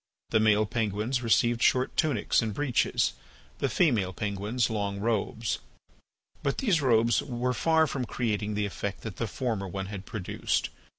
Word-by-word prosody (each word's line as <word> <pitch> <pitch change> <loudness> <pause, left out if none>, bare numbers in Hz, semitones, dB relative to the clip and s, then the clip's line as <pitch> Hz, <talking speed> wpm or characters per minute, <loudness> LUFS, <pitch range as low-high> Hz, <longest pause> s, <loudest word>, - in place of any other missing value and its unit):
The 110 - +4
male 110 0 +4
penguins 110 +3 -1
received 120 0 +2
short 130 0 +3
tunics 145 -10 +2
and 110 -3 -3
breeches, 145 -5 +1 0.5
the - - +1
female 110 - +2
penguins 105 +5 -1
long 100 -2 -2
robes. 110 +1 -1 0.8
But 140 -2 -1
these 200 - +2
robes 115 -3 +3
were 125 -1 -2
far 160 +6 +3
from 135 -4 -3
creating 105 -3 -2
the 105 0 0
effect 100 0 -4
that 110 -5 -7
the 115 - -1
former 110 -4 -2
one 95 +1 -4
had 95 -1 -7
produced. 100 -5 -2
110 Hz, 155 wpm, -28 LUFS, 105-125 Hz, 0.8 s, The